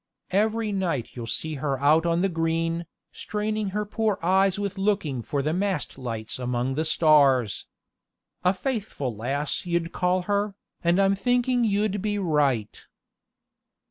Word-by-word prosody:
Every 215 +2 +1
night 175 - -1
you'll 120 -2 -6
see 160 +6 -2
her 140 -3 -1
out 155 +4 +4
on 170 +1 +2
the - - +4
green, 165 -1 -1 0.2
straining 215 -1 -2
her 210 +2 -2
poor 215 -1 0
eyes 190 +2 +3
with 200 -1 -3
looking 195 - 0
for 140 +4 -2
the 155 +2 0
mast 190 -3 -1
lights 115 -3 -5
among 125 +1 -1
the 155 +4 -1
stars. 140 - +3 0.8
A 180 - +5
faithful 195 - -3
lass 140 - -2
you'd 170 -1 0
call 180 0 +1
her, 205 +1 0 0.3
and 170 +2 +3
I'm 195 0 +4
thinking 245 +3 +1
you'd 205 -2 +1
be 210 0 -1
right. 145 - 0
175 Hz, 145 wpm, -25 LUFS, 145-205 Hz, 0.8 s, A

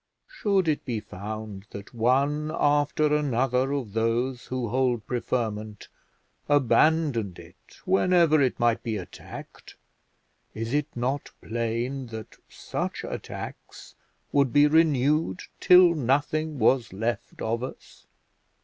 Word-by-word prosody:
Should 200 - 0
it 155 -2 0
be 120 -4 -2
found 105 0 -7
that 100 0 -10
one 140 +6 +1
after 145 +1 +2
another 130 -2 +1
of 130 -8 -3
those 120 +3 -1
who 125 -3 -3
hold 125 -2 0
preferment 110 -4 -3 0.6
abandoned 145 - +2
it - - -16
whenever 175 -5 +4
it 130 -2 +1
might 120 -1 +2
be 110 -2 -3
attacked, 90 - -10 0.8
is 115 +3 -4
it 145 0 +1
not 130 +4 -2
plain 120 +3 -3
that 110 -1 -9
such - - -4
attacks - - -8 0.4
would 140 -3 +3
be 145 +2 +6
renewed 150 +1 +2 0.2
till 180 -1 +7
nothing 150 +2 0
was 120 0 +2
left 110 +3 -3
us? 115 +3 -5
130 Hz, 115 wpm, -26 LUFS, 115-150 Hz, 0.8 s, till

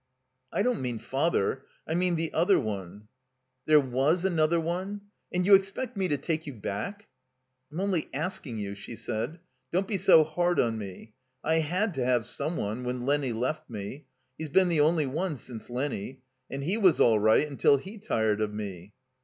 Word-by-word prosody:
"I 200 - +1
don't 245 -2 +1
mean 125 -2 -2
Father. 135 -1 0 0.2
I 160 - -1
mean 180 +1 +1
the 165 0 -2
other 180 +4 +4
one." 100 -1 -5 0.3
* 130 0 -51
'There 155 -1 +7
was 140 +7 +1
another 170 -2 +2
one? 185 +5 -3 0.3
And 180 0 0
you 200 - +6
expect 195 +6 +2
me 190 -2 0
to 145 - 0
take 155 +2 -2
you 145 - -5
back?" 115 - -5 0.6
"I'm 160 - -5
only 195 -5 0
asking 155 -5 -3
you," 100 -1 -4
she 100 +3 -8
said. 115 - -4 0.3
"Don't 190 +3 +1
be 200 - 0
so 160 - +7
hard 175 +3 0
on 115 -2 +1
me. 100 +1 -9 0.3
I 160 +1 +2
had 180 +6 0
to 135 -4 -1
have 125 -2 +2
some 155 +7 -2
one 110 +5 -3
when 125 0 -3
Lenny 140 -2 +1
left 135 +7 -2
me. 115 +6 -7 0.3
He's 160 -1 -4
been 185 +4 +4
the 165 -3 +3
only 155 0 +3
one 155 +4 -2
since 120 -1 -8
Lenny. 130 -1 -4 0.3
And 140 0 -4
he 185 +9 +1
was 190 -6 +4
all 110 -3 +5
right 110 +8 +4
imtil 140 -1 +3
he 200 +9 -9
tired 110 - 0
of 105 -1 0
me." 100 -2 -7
145 Hz, 190 wpm, -28 LUFS, 115-175 Hz, 0.6 s, There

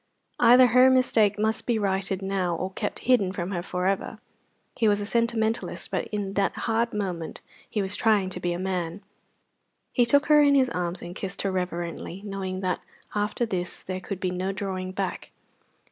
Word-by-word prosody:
Either 250 +2 +8
her 250 +2 +6
mistake 225 -5 +3
must 220 +1 -1
be 240 -2 +2
righted 195 -1 -1
now 190 -3 0
or 185 +3 -3
kept - - -3
hidden 235 -7 +3
from 185 0 -4
her 175 -3 -2
for 180 +1 -3
ever. 195 +3 -1 0.6
He 225 - +2
was 205 -1 +3
a 205 - -3
sentimentalist, 230 0 0
but - - -1
in 205 -3 -3
that 200 0 +1
hard 230 +1 +1
moment 185 -6 -4 0.3
he 210 - -1
was 190 +1 0
trying 210 -4 +2
to 180 - -3
be 175 -1 -1
a 175 - -2
man. 185 0 -3 0.9
He 245 -2 +3
took 285 +4 +4
her 300 0 +6
in 285 -1 +5
his 260 -3 +3
arms 175 0 -3
and 175 +1 -7
kissed 195 -1 -4
her 195 - 0
reverently, 180 0 -4
knowing 190 -2 -4
that 185 -2 -1 0.3
after 210 +3 0
this 180 -5 -3
there 185 0 -4
could 190 0 -5
be 185 -1 -1
no 185 +2 -2
drawing 190 -2 -4
back. 190 -1 -4
195 Hz, 190 wpm, -26 LUFS, 185-220 Hz, 0.9 s, Either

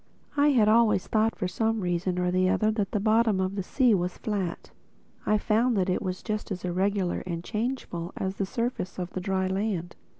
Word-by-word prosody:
I 290 0 +4
had 245 -8 +4
always 215 -3 +4
thought 220 +1 +1
for 185 - -2
some 225 +4 0
reason 180 0 -1
or 180 - 0
other 185 +4 +2
that 210 -3 -1
the 210 - 0
bottom 215 -1 +3
of 190 +1 -1
the 200 - -1
sea 245 +5 +3
was 180 -2 -1
flat. 195 -5 -3 0.6
I 215 - +4
found 225 +3 +2
that 185 -1 +1
it - - 0
was 185 0 -4
just 215 -2 -3
as 185 -3 -4
irregular 185 +1 0
and 170 -1 -3
changeful 215 -6 -3
as 190 0 -3
the 195 - -1
surface 230 -4 -3
of 180 -1 -4
the 185 - -3
dry 190 0 0
land. 190 -2 -2
195 Hz, 200 wpm, -27 LUFS, 180-220 Hz, 0.6 s, I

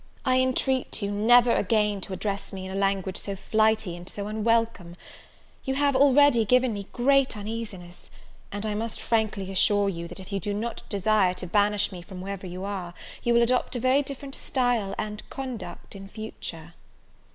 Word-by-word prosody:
I 255 0 +3
entreat 260 -2 0
you 200 - -1
never 235 +4 +5
again 210 -1 +1
to 195 - -7
address 200 +1 -3
me 190 -1 -6
in 190 - -6
a - - -5
language 195 -1 0
so 200 - -3
flighty 215 -2 +1
and 175 +1 -8
so 200 - -4
unwelcome. 220 -4 0 0.7
You 265 - -1
have 285 0 +2
already 280 -2 +5
given 250 +2 +3
me 200 -1 -6
great 270 -1 +2
uneasiness; 205 -5 -7 0.4
and 205 +1 -4
I 215 - -1
must 220 +2 -3
frankly 215 -4 -1
assure 200 +1 +3
you, 170 -2 -5
that 180 - -10
if 190 +1 -9
you 195 - 0
do 205 +2 -3
not 230 +3 -4
desire 200 -2 +2
to 180 - -6
banish 205 +3 +2
me 180 -2 -8
from 180 +1 -10
wherever 195 0 -5
you 180 +1 -6
are, 185 -3 -5 0.3
you 240 - +1
will 235 - +6
adopt 250 +2 +1
a - - -1
very 260 +3 +3
different 275 0 -7
style 245 -8 0
and 210 0 -4
conduct 255 -6 -7
in 195 0 -9
future." 175 -6 -7
210 Hz, 185 wpm, -26 LUFS, 195-240 Hz, 0.7 s, will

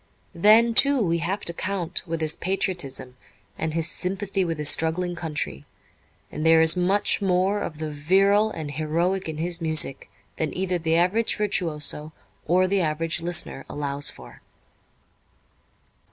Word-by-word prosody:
Then, 220 +6 +5
too, 280 +3 +3
we 170 -6 +1
have 190 +5 -2
to 170 - +5
count 185 -1 -2
with 165 0 -3
his 155 -1 +1
patriotism 145 -9 -3 0.4
and 160 -1 -3
his 165 -1 0
sympathy 195 +3 -2
with 165 -3 -3
his 150 -1 -1
struggling 175 +3 +2
country, 145 - -4 0.7
and 155 - -5
there 165 0 +6
is 160 +1 +4
much 190 +4 +2
more 190 +1 +1
of 155 - -5
the 155 0 -4
virile 195 +8 +3
and 155 -8 -6
heroic 165 +5 -1
in 155 - -5
his 170 +2 0
music 155 -4 0 0.3
than 160 +1 -3
either 185 -1 -1
the 160 0 0
average 185 +7 +1
virtuoso 155 -6 -1 0.3
or 185 +3 +3
the 195 0 +1
average 165 +1 -1
listener 170 -5 -3
allows 145 0 -2
for. 65 - -13
170 Hz, 150 wpm, -24 LUFS, 155-190 Hz, 0.7 s, there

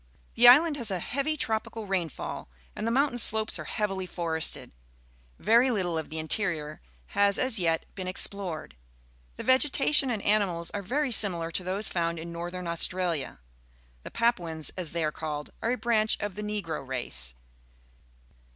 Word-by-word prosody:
The 240 +1 +5
island 295 +5 +7
has 235 -5 0
a 190 - -1
heavy 280 - -2
tropical 220 -2 -3
rainfall, 180 - -4 0.3
and 220 - -3
the - - +1
mountain 265 0 +1
slopes 220 0 +5
are - - -6
heavily 195 -4 -3
forested. 165 -3 -1 0.7
Very 235 +4 +4
Uttle 180 -9 -1
of 160 - -7
the 160 - -7
interior 155 -2 -1 0.3
has 200 0 +2
as 255 -4 +2
yet 165 -2 0
been 185 -2 -6
explored. 185 - -1 0.6
The - - -7
vegetation 270 +1 +3
and 220 -4 -3
animals 190 -5 +1
are 205 - -4
very 265 +8 -1
similar 175 -7 +4
to 180 - 0
those 195 +3 -2
found 170 -1 -2
in 165 +1 -7
Northern 175 +2 -6
AustraUa. 170 -2 -1 0.6
The - - -9
Papuans, 175 -10 0
as 180 -4 -4
they 170 -1 -1
are 155 - 0
called, 150 -1 -6
are 230 +2 0
a - - -2
branch 220 -3 +1
of 205 -2 -4
the 210 - -7
Negro 205 -8 -4
race. 65 - -2
195 Hz, 160 wpm, -27 LUFS, 165-225 Hz, 0.7 s, island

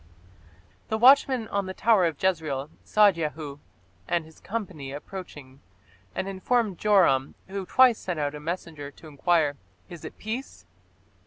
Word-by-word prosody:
The 220 - -1
watchman 255 -1 +5
on 200 -1 -1
the 190 - -6
tower 215 -5 +4
of 165 -4 -1
Jezreel 155 -6 -1
saw 210 -1 +5
Jehu 155 -4 -5 0.5
and 170 -2 0
his 160 0 -17
company 185 -11 -5
approaching 145 -4 -9 0.5
and 190 - -2
informed 195 +1 0
Joram, 175 -11 +3
who 190 -1 -5
twice 255 -3 +5
sent 180 -4 -4
out 145 -1 -1
a 150 - -7
messenger 155 -2 -5
to 150 +3 -15
enquire, 150 -1 +1 0.3
"Is 170 - -10
it - - -9
peace?" 220 - -6
175 Hz, 145 wpm, -26 LUFS, 150-205 Hz, 0.5 s, watchman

